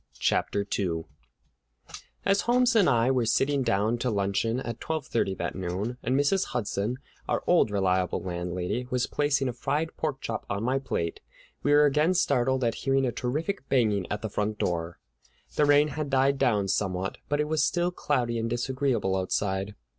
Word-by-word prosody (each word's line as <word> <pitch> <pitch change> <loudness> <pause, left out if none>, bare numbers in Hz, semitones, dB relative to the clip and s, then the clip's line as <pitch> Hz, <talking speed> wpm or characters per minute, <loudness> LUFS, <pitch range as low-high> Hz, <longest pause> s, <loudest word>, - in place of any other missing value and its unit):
CHAPTER 100 0 0
II 85 -4 -1 1.2
As 195 0 +3
Holmes 250 0 +4
and 205 -8 +5
I 120 0 +3
were 125 -3 +1
sitting 140 +4 +2
down 115 0 +1
to 125 - 0
luncheon 105 +3 0
at 120 -2 -5
twelve 160 -3 -3
thirty 100 -6 0
that - - -3
noon, 95 +7 -3
and 130 +2 +1
Mrs. 185 +7 +2
Hudson, 115 0 -2 0.3
our - - 0
old 175 -10 +4
reliable 95 -3 +1
landlady, 90 +6 -3
was 125 -1 +1
placing 145 -2 0
a 125 - -2
fried 150 +6 -2
pork 150 -4 -2
chop 115 -3 -4
on 100 +2 -2
my 130 +3 +1
plate, 85 -11 -3 0.4
we 145 - +1
were 145 0 +6
again 150 +5 +3
startled 130 -5 +2
at 115 -1 +2
hearing 135 0 +2
a 125 - 0
terrific 145 +8 -3
banging 105 -7 +1
at 105 +2 -3
the 110 - -2
front 105 +1 -1
door. 85 -2 -2 0.6
The 150 - +4
rain 145 +1 +5
had 150 -2 -4
died 135 +1 +2
down 105 -7 +2
somewhat, 95 -1 -1
but 145 0 +1
it 150 - +1
was 155 0 +1
still 175 0 +1
cloudy 125 -8 -1
and 115 +1 -2
disagreeable 120 -4 0
outside. 95 +1 -1
125 Hz, 175 wpm, -27 LUFS, 100-145 Hz, 1.2 s, were